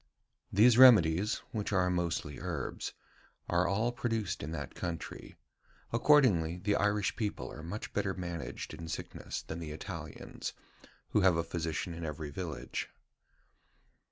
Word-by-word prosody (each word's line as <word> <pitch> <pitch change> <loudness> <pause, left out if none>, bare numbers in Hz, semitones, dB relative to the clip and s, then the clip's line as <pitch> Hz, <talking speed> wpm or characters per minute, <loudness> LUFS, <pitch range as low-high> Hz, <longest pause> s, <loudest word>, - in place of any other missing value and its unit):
These 115 +4 +6
remedies 105 -6 +7
[which 105 -2 -2
are 90 -2 +3
mostly 85 -5 -1
herbs], - - -4 0.5
are 85 +1 +2
all 110 +5 +1
produced 110 -5 -2
in 70 - -4
that 70 -5 -5
country. 85 -3 -5 0.6
Accordingly, 115 - +4
the 100 +3 +1
Irish 105 -1 +1
people 105 -3 -3
are - - -8
much 90 +7 -6
better 100 -2 0
managed 85 -3 -5
in 85 - -7
sickness 80 - -5
than 80 - -6
the 80 -2 -5
Italians, 75 - -6 0.6
who 105 - +3
have 95 -3 +5
a 85 - +1
physician 85 0 -3
in 85 0 -6
every 75 -1 -4
village." 85 +1 -4
90 Hz, 135 wpm, -32 LUFS, 80-105 Hz, 0.6 s, remedies